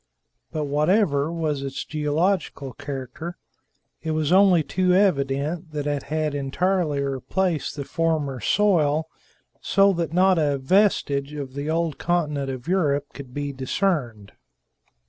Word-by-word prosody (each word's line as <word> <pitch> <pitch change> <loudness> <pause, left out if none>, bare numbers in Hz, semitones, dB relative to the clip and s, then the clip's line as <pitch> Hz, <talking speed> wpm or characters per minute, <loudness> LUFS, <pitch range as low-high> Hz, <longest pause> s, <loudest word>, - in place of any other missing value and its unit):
But 155 -2 -2
whatever 150 +1 +2
was 155 -4 -2
its 135 -1 -4
geological 155 -2 -1
character, 140 +7 -6 0.6
it 160 - -4
was 155 -1 0
only 185 -3 +5
too 180 +4 +1
evident 155 -2 +1
that 145 -1 -3
it 145 -1 -1
had 155 +1 -2
entirely 150 +3 0
replaced 150 +5 -1
the 140 -2 -5
former 155 -5 -1
soil, 160 -7 +2 0.5
so 195 0 +4
that 170 -4 -2
not 185 +1 +4
a 145 -2 +1
vestige 140 -3 +2
of 140 -3 -6
the 140 +2 -4
old 165 -2 -1
continent 150 -6 0
of 130 0 -6
Europe 145 -6 0
could 135 -3 -10
be 145 +1 -4
discerned. 130 - -1
150 Hz, 130 wpm, -24 LUFS, 140-175 Hz, 0.6 s, only